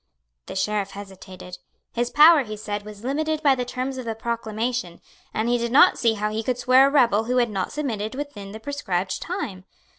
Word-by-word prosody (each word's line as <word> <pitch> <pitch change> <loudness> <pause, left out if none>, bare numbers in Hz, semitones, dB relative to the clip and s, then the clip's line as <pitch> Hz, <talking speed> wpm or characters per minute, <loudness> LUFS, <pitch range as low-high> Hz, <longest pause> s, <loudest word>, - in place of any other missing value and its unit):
The - - -7
Sheriff 205 0 -1
hesitated. 185 -2 -10 0.3
His 240 0 -1
power, 305 +2 +7
he 215 -2 -7
said, 205 -1 -5
was 210 0 -11
limited 310 +4 -1
by 280 -2 +5
the 250 -1 -2
terms 255 +2 -4
of 255 - -6
the 225 -1 -3
proclamation, 230 -3 -3 0.3
and 220 +2 -1
he 240 0 +2
did 235 0 -2
not 325 +8 +6
see 230 -2 +3
how 210 0 -2
he 220 +1 -2
could 245 +2 -2
swear 255 +2 +5
a - - -1
rebel 230 -6 +3
who 250 +2 0
had 240 -3 +2
not 195 -2 -3
submitted 225 -7 -3
within 240 -9 -7
the 220 - -8
prescribed 195 -8 -3
time. 235 - -5
230 Hz, 205 wpm, -23 LUFS, 205-260 Hz, 0.3 s, power